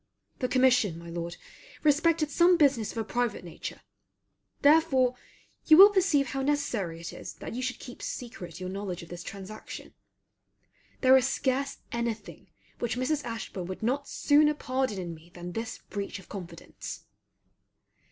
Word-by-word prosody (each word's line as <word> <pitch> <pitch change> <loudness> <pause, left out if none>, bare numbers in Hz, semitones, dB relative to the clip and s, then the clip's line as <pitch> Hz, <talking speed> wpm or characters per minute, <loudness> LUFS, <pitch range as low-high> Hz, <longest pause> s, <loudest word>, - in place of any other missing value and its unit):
The 255 - 0
commission, 250 -8 +3
my 170 0 -9
Lord, 170 0 -4 0.5
respected 305 +1 +3
some 350 +3 +5
business 275 -8 +3
of - - -10
a 225 - 0
private 240 -2 -1
nature; 170 - -7 0.8
therefore 285 -4 +5 0.5
you 315 - +9
will 400 +3 +11
perceive 350 -9 +3
how 270 - -2
necessary 245 - -1
it 170 - -6
is - - -8
that - - -8
you 250 - -3
should 255 -1 -2
keep 245 - -10
secret 220 -9 -6
your 185 - -4
knowledge 190 -2 -4
of 165 - -13
this 175 0 -7
transaction. 200 +3 -8 1.1
There 260 0 +7
is 260 0 +2
scarce 270 +1 -1
any 235 -1 0
thing 210 - -14 0.3
which 240 0 -1
Mrs. 290 +3 0
Ashburn 225 -6 -5
would 185 +3 -6
not 270 +5 0
sooner 300 +1 +4
pardon 260 -6 -1
in 175 -2 -4
me 165 +1 -14
than 175 0 -6
this 225 +4 -4
breach 200 0 -4
of 190 - -13
confidence. 175 -4 -8
245 Hz, 160 wpm, -29 LUFS, 190-280 Hz, 1.1 s, will